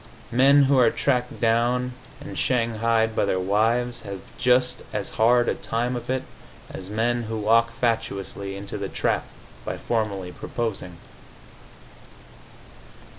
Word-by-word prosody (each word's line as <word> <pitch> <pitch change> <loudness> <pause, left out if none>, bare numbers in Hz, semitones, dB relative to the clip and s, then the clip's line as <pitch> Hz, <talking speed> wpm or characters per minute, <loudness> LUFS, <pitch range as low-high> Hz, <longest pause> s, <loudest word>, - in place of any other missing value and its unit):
Men 135 +4 +6
who 135 -1 +4
are 120 -2 +6
tracked 125 -1 -1
down 120 +2 +1 0.3
and 145 +1 -8
shanghaied 115 -2 +1
by - - +2
their 95 - 0
wives 115 +6 +1
have 100 -2 -7
just 125 0 +2
as 105 -1 -3
hard 120 +2 +3
a - - +2
time 120 +2 -2
of 120 - -6
it 130 0 0 0.5
as 95 0 -7
men 120 +3 0
who 110 -1 -4
walk 115 +2 +3
fatuously 100 -4 -2
into 100 +1 -6
the 100 -1 -3
trap - - 0 0.4
by - - -4
formally 100 -6 -2
proposing. 95 -6 -4
115 Hz, 130 wpm, -24 LUFS, 105-125 Hz, 0.5 s, Men